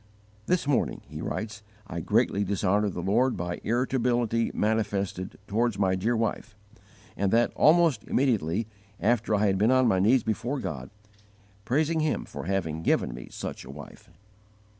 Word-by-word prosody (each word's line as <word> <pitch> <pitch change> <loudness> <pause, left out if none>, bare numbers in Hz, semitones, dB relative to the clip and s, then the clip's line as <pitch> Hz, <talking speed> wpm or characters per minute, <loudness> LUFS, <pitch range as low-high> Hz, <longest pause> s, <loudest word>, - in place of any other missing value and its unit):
"This 180 -4 +1
morning," 145 -2 0
he - - -7
writes, 110 0 -4 0.2
"I 85 -5 -5
greatly 100 +4 +1
dishonoured 100 +1 +1
the 90 - -4
Lord 120 +7 +2
by 85 0 -4
irritability 120 -1 +1
manifested 100 -4 -1
towards 115 +1 0
my 95 -2 +2
dear 110 +6 0
wife; 110 -1 -2 0.6
and 100 -1 0
that, 115 +1 +3
almost 160 -7 +4
immediately 110 - +1 0.3
after 110 0 +2
I 105 +1 +2
had 95 -2 +2
been 110 +3 +4
on 130 -1 +4
my 95 -4 +3
knees 115 +6 +4
before 120 +5 -2
God, 65 - -5 0.8
praising 155 +5 +1
Him 155 -1 0
for - - -8
having 85 -4 -2
given 65 - +1
me - - -9
such - - -6
a 65 - -13
wife." 70 +1 -11
110 Hz, 155 wpm, -27 LUFS, 95-120 Hz, 0.8 s, almost